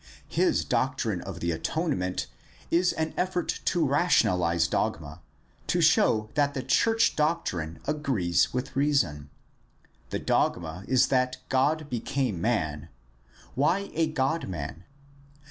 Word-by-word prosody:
His - - +1
doctrine - - -1
of - - -8
the 85 - 0
atonement 90 - -2 0.5
is 180 +2 +3
an 160 0 -2
effort 180 -2 -1
to 170 -3 +2
rationalize 90 - +2
dogma, 75 +1 -2 0.5
to - - +1
show 110 0 +3
that 145 -1 +1
the 130 - -3
church 225 - +3
doctrine 90 - -1
agrees 130 - +1
with 125 +1 -4
reason. 100 - +1 0.8
The - - -2
dogma 85 +3 -1
is 130 0 +3
that 130 -1 +1
God 145 +4 +1
became 125 - -2
man. 80 -8 -1 0.6
Why 175 +9 +1
a 165 0 +1
God 155 +1 -1
man 85 0 -6
130 Hz, 120 wpm, -27 LUFS, -, 0.8 s, is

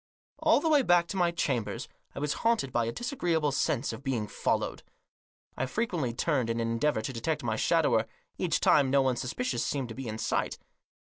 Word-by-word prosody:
All - - +4
the 330 - -1
way 300 -3 +5
back 175 -7 +4
to - - -4
my 175 -2 +3
chambers 135 -9 -2 0.3
I - - -4
was 145 0 0
haunted 225 - +1
by 120 -1 +1
a 115 - -2
disagreeable 170 - 0
sense 135 0 0
of - - -8
being 125 -6 -1
followed. - - -1 0.7
I 130 - -2
frequently 175 - -1
turned 130 -1 0
in 115 0 -1
an 115 0 0
endeavour 115 0 +1
to 130 - -4
detect 150 +6 -2
my 110 -2 0
shadower; - - +2 0.3
each - - 0
time 140 -3 +4
no 135 0 +4
one 130 -1 +1
suspicious 190 - -2
seemed 135 -4 -2
to - - -6
be 135 -2 -6
in 110 0 -4
sight. - - -1
135 Hz, 200 wpm, -29 LUFS, 120-170 Hz, 0.7 s, way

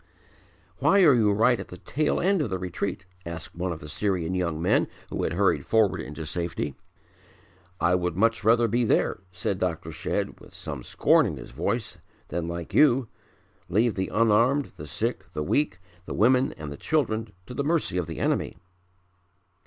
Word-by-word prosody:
"Why 200 -1 +5
are 150 -5 +7
you 110 -4 +4
right 115 +4 +3
at - - -6
the 90 - -10
tail 150 +10 0
end 190 -1 +2
of 135 - -1
the 95 - -1
retreat?" 95 +2 -4 0.2
asked 80 -1 -6
one 90 +1 -2
of 80 - -5
the 75 - -8
Syrian 90 +1 -1
young 85 -4 -1
men 85 - +2 0.2
who - - -2
had 80 - -1
hurried 100 +3 +2
forward 110 -3 +2
into 75 +3 -7
safety. 85 -2 -3 1.1
"I 85 +1 +3
would 90 -2 0
much 115 0 +2
rather 115 +2 +4
be 120 +3 +1
there," 110 - +1
said 95 +1 -2
Dr. 90 -4 -2
Shedd - - -3
with - - -15
some 75 -4 -6
scorn - - +3
in - - -4
his - - -10
voice, 105 -4 -2 0.3
"than 85 +1 -2
like 85 -1 -5
you, 130 -5 +4 0.6
leave 110 +5 +2
the 95 0 -2
unarmed, 115 +6 +3
the 75 - -9
sick, - - -3
the 75 - -2
weak, 145 - +1 0.3
the - - -4
women 125 +6 +3
and 75 -2 -8
the 70 - -7
children 115 -8 0
to 125 - -8
the 140 - -1
mercy 155 - +1
of 85 - -3
the 80 -3 -6
enemy." - - 0
100 Hz, 185 wpm, -26 LUFS, 85-120 Hz, 1.1 s, are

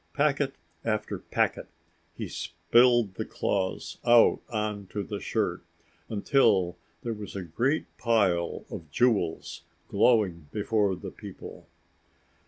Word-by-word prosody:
Packet 145 -2 +1 0.3
after 110 -2 -2
packet, - - -1 0.5
he - - -4
spilled 110 +6 +3
the - - -3
claws 95 -2 -2
out 120 -1 +6
on 105 -3 -3
to 105 +2 -4
the 85 - -5
shirt - - -1 0.5
until 100 -5 +3 0.3
there 115 - -2
was 105 -2 -8
a 95 - -3
great 120 - 0
pile 95 -8 +1
of 80 -3 -7
jewels 100 - +1 0.3
glowing 90 -10 +2
before 105 -2 +1
the - - -8
people. - - -10
105 Hz, 115 wpm, -28 LUFS, 95-120 Hz, 0.5 s, out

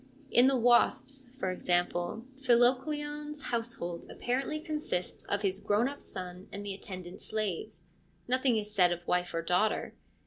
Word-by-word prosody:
In 245 +2 +7
the 270 -1 +4
Wasps, 250 +3 +3
for 190 -8 -1
example, 175 +3 0 0.2
Philocleon's 295 +4 +2
household 230 -8 -3
apparently 270 +5 -1
consists 305 - -3
of 205 +1 -1
his 195 -1 +1
grown 210 +5 +2
up 285 +1 -6
son 180 +1 -7
and 205 +1 -6
the 200 - -3
attendant 185 -2 -8
slaves: 185 -6 -3 0.4
nothing 255 -1 +3
is 210 0 -3
said 180 -3 +5
of 175 0 -3
wife 180 0 +1
or 165 - -1
daughter. 180 +6 +1
215 Hz, 145 wpm, -31 LUFS, 180-260 Hz, 0.4 s, In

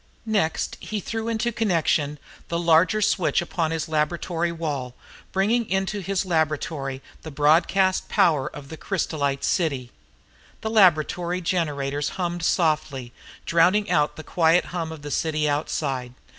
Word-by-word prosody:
Next 205 -8 0
he 215 - -4
threw 225 +3 -4
into 230 +1 0
connection 165 -9 +1 0.3
the 170 - -2
larger 170 +5 +3
switch 185 -3 +2
upon 170 -2 -1
his 160 -1 -2
laboratory 165 +2 -1
wall 145 -7 -4 0.4
bringing 220 +4 +1
into 190 +2 -1
his 195 0 -1
laboratory 155 -5 -1 0.2
the 160 - -8
broadcast 165 +6 +2
power 150 -5 +3
of 145 -2 -9
the 160 - -8
crysolite 145 -7 -2
city. 135 -9 0 0.7
The 220 - -3
laboratory 180 -3 +3
generators 145 -5 -1
hummed 175 -1 -2
softly, 150 -8 0 0.3
drowning 185 +5 +3
out 150 0 +2
the 155 - -8
quiet 165 +2 +3
hum 165 -3 -3
of 155 -3 -9
the 145 - -6
city 155 -1 0
outside. 135 -4 -2
165 Hz, 135 wpm, -24 LUFS, 150-185 Hz, 0.7 s, larger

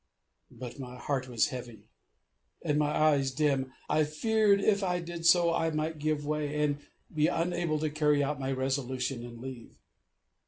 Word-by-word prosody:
But 125 +2 -9
my 125 -1 -7
heart 130 +1 -2
was 120 -3 +1
heavy, 120 -4 -9 0.7
and 150 0 +1
my 150 -1 +2
eyes 150 -3 +3
dim; 135 -1 0 0.2
I 155 - +3
feared 205 +6 +2
if 200 0 +2
I 180 -1 0
did 170 -1 -3
so 170 -1 +5
I 165 0 +1
might 155 0 -2
give 150 -1 -1
way, 150 0 -1
and 145 -1 0 0.3
be 155 0 +3
unable 170 -2 0
to 155 0 -1
carry 150 -1 +2
out 145 0 -2
my 135 0 -2
resolution, 130 -1 -2
and 120 -1 -9
leave. 130 -2 -9
150 Hz, 165 wpm, -30 LUFS, 130-160 Hz, 0.7 s, so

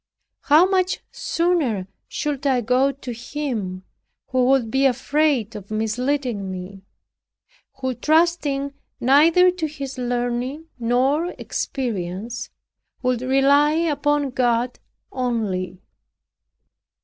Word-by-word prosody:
How 315 +4 +6
much 375 -1 +1
sooner 305 - 0 0.2
should 290 -1 -2
I 255 -3 +2
go 250 +4 +2
to 260 -2 -7
him 230 -7 -4 0.5
who 255 -1 +2
would 255 -4 +2
be 270 +2 +4
afraid 265 -3 +1
of 205 -2 -9
misleading 225 0 -1
me; 185 +1 -7 0.9
who 260 -1 -2
trusting 295 0 +1 0.3
neither 320 +8 +5
to 350 -3 -3
his 275 -3 -7
learning 245 +4 -2
nor 265 +8 +1
experience, 230 -1 -4 0.5
would 250 -1 +1
rely 275 +3 +4
upon 290 -3 +1
God 245 -1 0 0.3
only! 200 -8 -2
260 Hz, 100 wpm, -22 LUFS, 235-290 Hz, 0.9 s, How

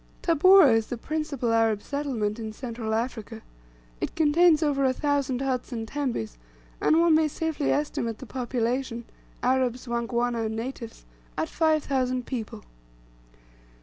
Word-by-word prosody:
Tabora* 340 -3 +6
is 225 -1 +1
the 245 - -4
principal 280 -4 -2
Arab 225 -2 +2
settlement 245 -7 -2
in 220 -1 -5
Central 225 -2 -4
Africa. 225 -1 -4 0.6
It - - -4
contains 320 +1 +4
over 285 -2 +1
a 260 -1 +3
thousand 280 -2 -1
huts 260 -2 -2
and 225 -2 -4
tembes, 240 - -3 0.4
and 315 - +4
one 335 -1 +5
may 310 0 +4
safely 315 -1 -2
estimate 235 -6 -1
the 260 - -9
population, 245 -1 -2 0.4
Arabs, 255 -1 +1
Wangwana, 235 0 -1
and 220 - -4
natives, 230 0 -6 0.3
at 320 - -1
five 315 -2 +2
thousand 255 -2 -1
people. 235 -5 -5
255 Hz, 140 wpm, -26 LUFS, 230-290 Hz, 0.6 s, Tabora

